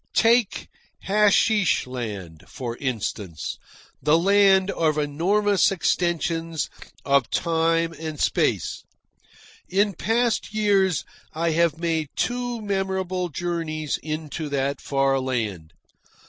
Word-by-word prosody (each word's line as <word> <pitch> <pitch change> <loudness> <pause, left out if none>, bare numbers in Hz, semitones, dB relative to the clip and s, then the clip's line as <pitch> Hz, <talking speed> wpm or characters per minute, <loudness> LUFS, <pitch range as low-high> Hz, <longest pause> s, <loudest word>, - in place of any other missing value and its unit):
Take 230 -2 +3 0.4
Hasheesh 210 0 +3
Land, 105 -11 -6
for 120 -3 -5
instance, 105 - -4 0.4
the 150 +2 +4
land 195 +1 +4
of 155 -4 +1
enormous 190 +8 +2
extensions 165 -3 -1 0.3
of 140 -4 +3
time 165 0 +1
and 155 -2 -5
space. - - 0 0.9
In 200 +2 +2
past 225 +3 0
years 195 -6 +2 0.3
I 165 +1 0
have 165 -1 +2
made 165 -3 -1
two 245 -2 -2
memorable 190 -2 -1
journeys 155 -2 -3
into 155 0 -4
that 140 0 -1
far 135 -1 +1
land. 110 -11 -3
165 Hz, 100 wpm, -24 LUFS, 140-195 Hz, 0.9 s, the